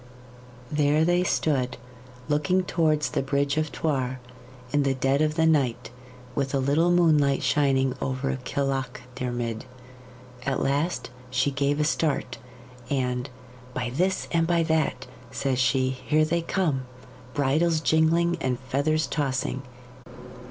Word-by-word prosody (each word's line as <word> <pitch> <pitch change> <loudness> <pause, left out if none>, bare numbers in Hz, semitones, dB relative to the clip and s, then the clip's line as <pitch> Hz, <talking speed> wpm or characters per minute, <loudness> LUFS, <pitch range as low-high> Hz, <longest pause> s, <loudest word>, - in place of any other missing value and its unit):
There 150 +1 +3
they 175 +1 +3
stood, 135 -7 0 0.5
looking 150 +5 +2
towards 155 -6 +1
the - - 0
bridge 140 +1 0
of 155 -1 0
Thuar, 130 -5 -1 0.6
in 145 - +3
the 135 -1 +1
dead 135 +2 +1
of 155 0 +1
the 160 0 +3
night, 130 -8 +1 0.4
with 140 0 -1
a - - +3
little 145 +6 +2
moonlight 155 -6 +3
shining 135 -3 +2
from 130 - -4
over 135 +1 -2
Kilachdiarmid. 125 -3 -3 0.8
At 135 0 -1
last 145 0 -1 0.2
she 130 +3 +1
gave 140 +1 0
a - - +3
start, 150 -5 -1 0.5
and 125 -1 -1 0.5
"By 125 -1 -2
this 185 +8 0
and 165 -1 +2
by 170 -1 +2
that," 160 -1 0 0.2
says 135 -2 -1
she, 130 +1 +2
"here 150 +4 +1
they 170 +2 0
come, 155 -7 -1 0.5
bridles 155 +4 +2
jingling 165 +2 +2
and 125 -2 0
feathers 145 +4 0
tossing!" 130 -3 -2
140 Hz, 130 wpm, -26 LUFS, 130-160 Hz, 0.8 s, There